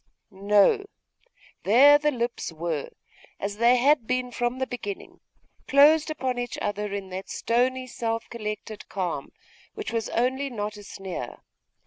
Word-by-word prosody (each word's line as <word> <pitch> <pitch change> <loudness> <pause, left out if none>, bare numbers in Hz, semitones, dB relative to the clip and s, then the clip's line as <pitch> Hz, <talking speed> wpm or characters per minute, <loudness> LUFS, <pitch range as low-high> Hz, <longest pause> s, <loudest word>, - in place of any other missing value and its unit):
No! 200 - +3 0.8
there 280 +8 +7
the 300 0 +2
lips 240 - -3
were, 160 -2 -3 0.5
as 205 +1 -4
they 235 +2 +5
had 260 -1 +3
been 255 0 -1
from 240 +1 -1
the 260 - -1
beginning, 390 +11 -7 0.5
closed 300 +3 +6
upon 260 -5 -2
each 245 -1 -4
other 205 0 -2
in 200 -1 -5
that 190 +1 -6
stony 255 +3 0
self 230 -2 -3
collected 215 -1 -6
calm, 175 -7 -3 0.4
which 425 - -5
was 225 -1 -1
only 260 +4 0
not 210 -3 -4
a 205 - -10
sneer. 190 - -7
235 Hz, 140 wpm, -26 LUFS, 205-260 Hz, 0.8 s, there